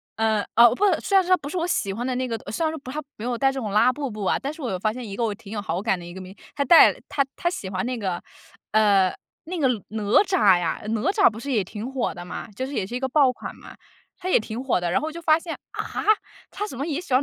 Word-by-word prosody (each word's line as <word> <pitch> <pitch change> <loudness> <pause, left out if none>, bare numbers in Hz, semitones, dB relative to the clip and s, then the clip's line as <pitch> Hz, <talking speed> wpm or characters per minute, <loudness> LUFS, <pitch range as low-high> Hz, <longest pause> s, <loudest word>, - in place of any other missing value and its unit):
呃， 220 -2 +1
啊， 235 +1 +8
不 250 - +1 0.2
虽 395 - 0
然 380 - +5
说 360 - -7
他 370 - +6
不 285 -1 -7
是 365 - -4
我 335 - 0
喜 200 - 0
欢 240 +4 -4
的 255 - -1
那 255 +1 -1
个， 230 -2 -2
虽 275 - -2
然 315 - +1
说 320 - -5
不， 255 -2 -9
他 300 +3 -3 0.2
没 215 - -6
有 245 -1 -1
戴 270 +1 +3
这 270 - -4
种 215 -5 -4
拉 215 +5 +5
布 280 0 -4
布 210 -1 -6
啊。 - - +2
但 280 +2 -3
是 315 - -12
我 250 - -2
又 185 - -2
发 215 +3 +1
现 250 -2 -7
一 195 - -6
个 235 - -1
我 220 -2 0
挺 205 -1 -13
有 210 - -3
好 180 -2 -2
感 200 -5 0
的 170 - -10
一 175 - -9
个 190 - -8
明 185 +1 -10
星， - - -21
他 285 - +1
戴 330 +5 +8
了 - - -13
他 280 - +2
他 345 - 0
喜 200 - -5
欢 185 +2 -2
那 250 0 -2
个 190 -5 -3 0.5
呃， 200 -3 +4 0.3
那 360 +3 -4
个 280 - +3 0.2
哪 215 0 -4 0.2
吒 215 - +4
呀， 170 -2 -2
哪 220 -1 -1
吒 400 -1 +5
不 220 -1 -9
是 280 +4 -5
也 220 -6 +2
挺 210 +6 -6
火 260 -3 -1
的 175 - -8
嘛， 180 - -6
就 260 - -3
是 275 - -7
也 190 - -1
是 240 - -6
一 250 - -1
个 265 - -1
爆 270 -1 +4
款 - - -8
嘛， - - -13 0.4
它 370 0 -4
也 - - +5
挺 220 +2 -5
火 265 -8 +1
的。 175 - -1
然 - - +3
后 305 - -2
我 - - -4
就 335 +2 -8
发 315 -1 +4
现， 330 -1 -6 0.2
啊？ - - -4 0.7
他 415 +1 -4
怎 265 - -8
么 275 - -2
也 305 0 -1
喜 290 - -5
欢？ 255 - +5
245 Hz, 340 characters per minute, -24 LUFS, 210-290 Hz, 0.7 s, 啊